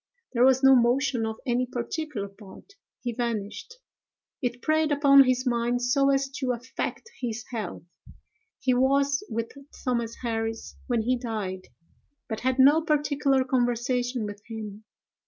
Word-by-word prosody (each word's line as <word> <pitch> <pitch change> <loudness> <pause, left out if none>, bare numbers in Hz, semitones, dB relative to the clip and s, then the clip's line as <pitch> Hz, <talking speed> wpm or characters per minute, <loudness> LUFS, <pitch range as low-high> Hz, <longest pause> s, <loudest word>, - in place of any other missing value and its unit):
There 240 0 +3
was 265 +1 +4
no 270 0 +8
motion 245 0 +2
of 220 - -3
any 250 0 +1
particular 245 -2 -4
part: 200 - -15 0.3
he 240 -1 -2
vanished. 235 - -4 0.7
It 245 -2 -2
preyed 310 0 +2
upon 280 -1 +7
his 255 0 +1
mind 240 0 0
so 275 +3 +3
as 275 0 +2
to 255 -2 0
affect 250 - -5
his 235 -2 -3
health. 215 -7 -5 0.7
He 255 - +1
was 275 +2 +2
with 230 0 -3 0.3
Thomas 235 -3 -1
Harris 225 -1 -3
when 240 -4 +1
he 250 +2 +1
died, 210 -6 -4 0.6
but 220 -3 -4
had 260 0 0
no 285 +4 +6
particular 290 -4 +1
conversation 245 -1 0
with 205 0 -7
him. 215 -2 -7
245 Hz, 140 wpm, -26 LUFS, 230-270 Hz, 0.7 s, no